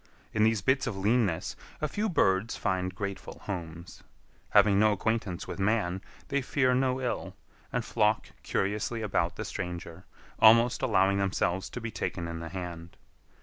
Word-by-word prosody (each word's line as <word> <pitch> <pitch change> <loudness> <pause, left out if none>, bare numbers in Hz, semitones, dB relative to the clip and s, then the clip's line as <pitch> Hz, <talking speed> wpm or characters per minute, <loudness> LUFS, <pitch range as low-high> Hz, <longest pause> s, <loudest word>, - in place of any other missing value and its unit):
In 110 - +3
these 110 -3 +2
bits 130 +2 +2
of 110 -5 -3
leanness 100 -4 +1 0.2
a 150 - 0
few 210 +8 -1
birds 95 - +2
find 90 -1 -1
grateful 100 0 -5
homes. 85 -3 -6 0.5
Having 100 -2 +5
no 110 0 +5
acquaintance 105 -3 -2
with - - -6
man, 95 -3 +1 0.3
they 140 0 +1
fear 130 0 +2
no 130 0 +1
ill, 125 -2 -3 0.4
and 125 -2 -1
flock 105 -3 +1
curiously 105 +3 -1
about 90 -4 0
the 110 - -5
stranger, 90 -3 -6 0.3
almost 115 +2 +6
allowing 95 +1 +3
themselves 95 -1 0
to - - -6
be 115 -1 -5
taken 85 -5 -3
in 85 0 -5
the 85 0 -6
hand. 85 -2 -7
100 Hz, 155 wpm, -29 LUFS, 90-115 Hz, 0.5 s, almost